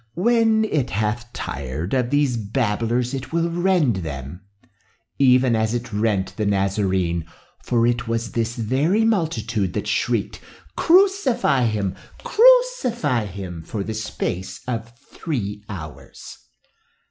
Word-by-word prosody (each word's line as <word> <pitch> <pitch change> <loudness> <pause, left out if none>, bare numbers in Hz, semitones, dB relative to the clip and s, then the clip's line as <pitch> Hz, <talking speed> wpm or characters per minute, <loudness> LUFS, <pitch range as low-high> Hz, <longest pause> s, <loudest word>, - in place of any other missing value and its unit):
When 225 +1 +3
it 150 - -1
hath 110 +3 -2
tired 70 - -5
of 125 -2 +1
these 145 -3 +2
babblers 115 +2 -1
it 130 -1 -5
will 170 +1 0
rend 175 - +2
them, 75 0 -6 0.8
even 130 -2 +4
as 110 +1 0
it 120 -2 -5
rent 105 -2 0
the 105 - -1
Nazarene, 95 -4 0 0.4
for 115 -1 +2
it 120 0 0
was 115 0 -2
this 115 0 -1
very 140 - +1
multitude 120 - 0
that 105 - -3
shrieked, 110 0 -1 0.3
'Crucify 335 - +3
him! 105 -4 -1 0.3
crucify 425 - +3
him!' 90 -3 -7
for 100 +5 -4
the 110 - -4
space 105 -4 -4
of 115 -2 -4
three 105 -8 -5
hours. 80 -7 -10
115 Hz, 125 wpm, -22 LUFS, 100-145 Hz, 0.8 s, even